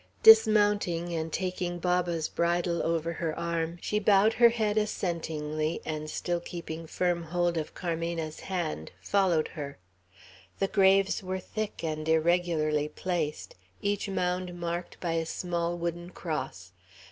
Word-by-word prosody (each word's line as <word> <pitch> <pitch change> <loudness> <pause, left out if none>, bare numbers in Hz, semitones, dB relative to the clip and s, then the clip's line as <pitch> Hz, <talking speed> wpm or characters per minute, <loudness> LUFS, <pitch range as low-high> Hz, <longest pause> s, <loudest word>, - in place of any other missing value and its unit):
Dismounting, 205 - +6
and 160 -1 -2
taking 180 -1 -2
Baba's 175 -2 0
bridle 170 0 0
over 165 0 0
her 160 -1 -3
arm, 170 0 -2
she 210 - 0
bowed 210 +1 +5
her 235 0 +7
head 220 -3 0
assentingly, 160 -6 -1
and 155 -1 -4
still 175 +2 -1
keeping 165 -1 -7
firm 175 +1 0
hold 175 +1 0
of 155 -2 -4
Carmena's 165 -2 -3
hand, 170 - -3
followed 185 -6 +2
her. 140 -2 -7 0.8
The 195 - 0
graves 195 -1 +4
were 185 0 -3
thick, 215 +1 -5
and 155 -1 -2
irregularly 160 -2 +2
placed, 160 -2 -3 0.3
each 205 0 0
mound 180 -1 -2
marked 170 +1 -4
by 170 - -2
a 165 0 +1
small 175 0 -2
wooden 170 0 -3
cross. 95 - -5
170 Hz, 135 wpm, -29 LUFS, 160-185 Hz, 0.8 s, her